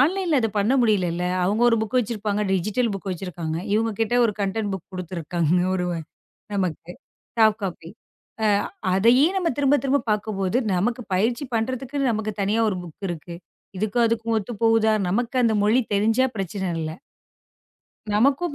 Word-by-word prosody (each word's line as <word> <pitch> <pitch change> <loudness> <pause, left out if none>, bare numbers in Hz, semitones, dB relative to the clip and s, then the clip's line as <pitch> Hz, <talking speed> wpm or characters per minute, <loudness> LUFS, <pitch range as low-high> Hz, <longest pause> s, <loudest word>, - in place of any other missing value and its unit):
ஆன்லைன்ல 335 +1 +2
அத 225 - +1
பண்ண 205 +5 +2
முடியலல்ல. 185 -7 +1 0.2
அவங்க 205 +5 +1
ஒரு 230 - +3
புக் 220 +3 -2
வச்சிருப்பாங்க. 210 -3 -1
டிஜிட்டல் 215 +5 0
புக் 195 0 -6
வச்சிருக்காங்க. 170 -3 -4 0.2
இவங்க 225 +1 +1
கிட்ட 225 +1 +1
ஒரு 225 - +2
கன்டென்ட் 205 +1 -1
புக் 190 -1 -7
குடுத்துருக்காங்க. 175 -2 -1 0.2
ஒரு 180 -1 -1 0.7
நமக்கு 180 -3 -2 0.5
சாஃப்ட் 220 -1 +4
காஃபி. 175 -3 -5 0.5
அ - - +3 0.5
அதையே 235 +8 +5
நாம 360 -3 +1
திரும்பத் 285 0 +3
திரும்பப் 275 -1 0
பார்க்கும்போது, 210 -1 -1 0.2
நமக்கு 230 +7 0
பயிற்சி 230 +8 +1
பண்றதுக்கு 255 +4 -2
நமக்குத் 215 -1 -3
தனியா 205 +3 +1
ஒரு 190 - -3
புக் 175 +3 -9
இருக்கு. 170 +1 -6 0.4
இதுக்கும் 220 +4 +1
அதுக்கும் 230 0 -1
ஒத்துப்போகுதா? 220 +1 +2 0.2
நமக்கு 240 +6 -1
அந்த 225 - +3
மொழி 225 +5 +4
தெரிஞ்சா 225 +5 +3
பிரச்சனை 190 0 -3
இல்ல. 155 -1 -3 1.2
நமக்கும் 280 +8 +2
215 Hz, 145 wpm, -23 LUFS, 190-235 Hz, 1.2 s, அதையே